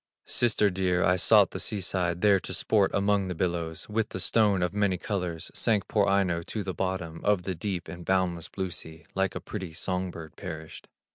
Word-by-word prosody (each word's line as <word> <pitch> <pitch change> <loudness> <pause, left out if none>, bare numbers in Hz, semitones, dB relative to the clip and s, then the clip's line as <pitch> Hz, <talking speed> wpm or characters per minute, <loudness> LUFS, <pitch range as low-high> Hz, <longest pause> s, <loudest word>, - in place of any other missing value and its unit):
"Sister 110 -4 +2
dear, 90 -1 +1
I 90 +1 +4
sought 90 - +5
the - - -5
sea 105 - -1
side, 90 -2 -1
There 100 -2 +5
to - - -5
sport 105 -3 +3
among 100 -1 +2
the 90 - -3
billows; 85 -2 -2
With 110 +1 -1
the 95 - -5
stone 100 -1 +3
of 90 - -1
many 100 -3 +1
colors 90 -4 -3
Sank 105 -4 +1
poor 105 -2 +2
Aino 95 -4 +2
to 105 +5 -4
the 95 -1 -3
bottom 90 -1 -3
Of 100 -3 +2
the 95 - -2
deep 90 0 -4
and 85 +2 -8
boundless 90 -2 0
blue 95 -2 -3
sea, 80 -1 -8
Like 95 0 0
a - - -2
pretty 95 -6 -6
song 90 0 -2
bird 80 -2 -9
perished. 80 0 -8
95 Hz, 205 wpm, -28 LUFS, 85-100 Hz, -, sought